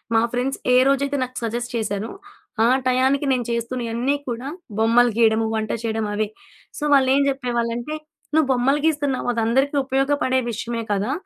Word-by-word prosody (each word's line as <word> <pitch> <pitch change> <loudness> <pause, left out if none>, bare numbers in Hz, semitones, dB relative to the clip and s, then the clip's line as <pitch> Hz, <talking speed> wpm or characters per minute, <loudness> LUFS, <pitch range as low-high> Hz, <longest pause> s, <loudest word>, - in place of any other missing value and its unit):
మా 225 - +5
ఫ్రెండ్స్ 250 +2 -1 0.2
ఏ - - +7
రోజైతే 280 +1 +1
నాకు 255 0 -7
సజెస్ట్ 240 +2 -3
చేశారో, 215 -1 -2 0.5
ఆ - - +5 0.2
టయానికి 265 +3 +2
నేను 250 -2 0
చేస్తున్నయన్నీ 235 +2 -1
కూడా 240 +3 -4 0.3
బొమ్మలు 235 +2 +4
గీయడము, 225 -1 +3
వంట 220 -1 -2
చేయడం 220 -1 -1
అవే. 215 +1 0 0.5
సో, - - -5
వాళ్ళేం 270 0 +4
చెప్పేవాళ్ళంటే 240 +1 -2 0.4
"నువ్వు 315 -3 +3
బొమ్మలు 270 +4 +2
గీస్తున్నావు. 285 -5 0
అదందరికీ 240 +5 +1
ఉపయోగపడే 270 -1 +1
విషయమే 230 +1 -4
కదా! 205 +6 -1
245 Hz, 145 wpm, -22 LUFS, 230-270 Hz, 0.5 s, ఏ